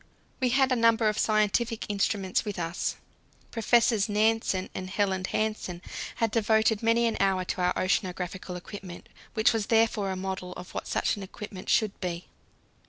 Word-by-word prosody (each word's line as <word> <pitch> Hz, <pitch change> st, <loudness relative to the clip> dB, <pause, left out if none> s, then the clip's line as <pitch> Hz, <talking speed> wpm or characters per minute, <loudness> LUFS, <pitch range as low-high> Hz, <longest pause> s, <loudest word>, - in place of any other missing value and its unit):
We 255 Hz, -2 st, +2 dB
had 265 Hz, +1 st, +3 dB
a -, -, +4 dB
number 230 Hz, -1 st, +4 dB
of 210 Hz, -, -2 dB
scientific 215 Hz, +2 st, +1 dB
instruments 200 Hz, -2 st, 0 dB
with 205 Hz, -2 st, -5 dB
us. 170 Hz, 0 st, -2 dB, 0.6 s
Professors 230 Hz, -2 st, +3 dB
Nansen 210 Hz, -3 st, +1 dB
and 185 Hz, 0 st, -5 dB
Helland 190 Hz, -1 st, 0 dB
Hansen 215 Hz, -5 st, -2 dB, 0.4 s
had 230 Hz, -2 st, 0 dB
devoted 220 Hz, -1 st, +2 dB
many 230 Hz, +1 st, +3 dB
an 230 Hz, -, 0 dB
hour 190 Hz, -2 st, +2 dB
to 180 Hz, -, -3 dB
our 180 Hz, 0 st, +2 dB
oceanographical 185 Hz, -1 st, -1 dB
equipment, 180 Hz, -1 st, -9 dB, 0.3 s
which 220 Hz, +1 st, +4 dB
was 220 Hz, -2 st, -1 dB
therefore 225 Hz, -3 st, +2 dB
a 190 Hz, -, -2 dB
model 185 Hz, -1 st, -4 dB
of 180 Hz, -, -10 dB
what -, -, -4 dB
such -, -, 0 dB
an -, -, -6 dB
equipment 195 Hz, 0 st, -8 dB
should 215 Hz, -2 st, +2 dB
be. 175 Hz, -2 st, -3 dB
205 Hz, 165 wpm, -28 LUFS, 185-225 Hz, 0.6 s, a